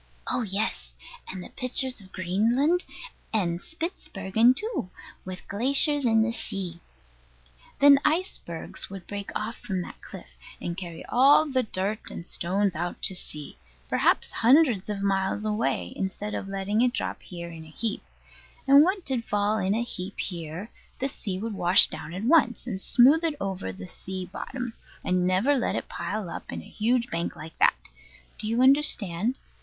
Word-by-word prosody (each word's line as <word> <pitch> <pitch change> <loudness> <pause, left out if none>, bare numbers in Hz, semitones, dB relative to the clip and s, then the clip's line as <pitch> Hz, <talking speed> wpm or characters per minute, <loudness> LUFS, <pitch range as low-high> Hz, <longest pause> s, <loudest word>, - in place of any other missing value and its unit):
Oh - - 0
yes, 210 0 -2 0.4
and 185 -1 -8
pictures 255 -1 +1
of 190 -1 -16
Greenland 235 - +1 0.5
and 175 -5 0
Spitzbergen 235 - 0
too, 430 - -3 0.3
with 185 -1 -8
glaciers 275 +6 +3
in 225 -2 +4
the 230 - 0
sea. 190 -6 -3 1.0
Then 280 -1 +7
icebergs 305 - -1
would 195 -2 -9
break 200 -1 -6
off 220 +2 -3
from 185 -3 -3
that - - -11
cliff, - - -12 0.2
and 170 - -4
carry 170 -3 -7
all 275 +5 +5
the 265 -4 +1
dirt 210 -1 -3
and 170 - -8
stones 190 +2 0
out 175 +2 -3
to - - +3
sea, 150 -5 -7 0.3
perhaps - - +2
hundreds 240 - +4
of 200 -1 -3
miles 195 +1 0
away, 175 - -1
instead 200 +2 -4
of - - -4
letting 195 +3 -1
it 245 0 +3
drop - - -3
here 170 -2 -8
in 165 -1 -9
a 160 - -13
heap; 215 +6 -3 0.7
and 280 +1 +8
what 375 +2 0
did 255 -4 -1
fall 210 0 0
in 195 +1 +1
a 235 - 0
heap 190 -4 -7
here 170 +3 -5 0.3
the 270 - -1
sea 195 -7 -4
would 220 +3 -4
wash 180 -1 +6
down - - -6
at 185 +4 -5
once, 250 -3 +3
and 200 -6 -4
smooth 275 - +6
it 325 -3 +1
over 190 - -3
the 90 0 -9
sea 185 - -7
bottom, 245 +5 -6 0.3
and 180 0 +2
never 190 +10 +3
let 250 - 0
it - - -3
pile 185 +3 -4
up 170 - -7
in - - -6
a - - -14
huge 235 +3 0
bank 170 +1 -2
like 160 +1 -10
that. - - +5 0.6
Do 215 - -3
you 230 +3 +2
understand? 250 - +3
205 Hz, 170 wpm, -26 LUFS, 185-250 Hz, 1.0 s, and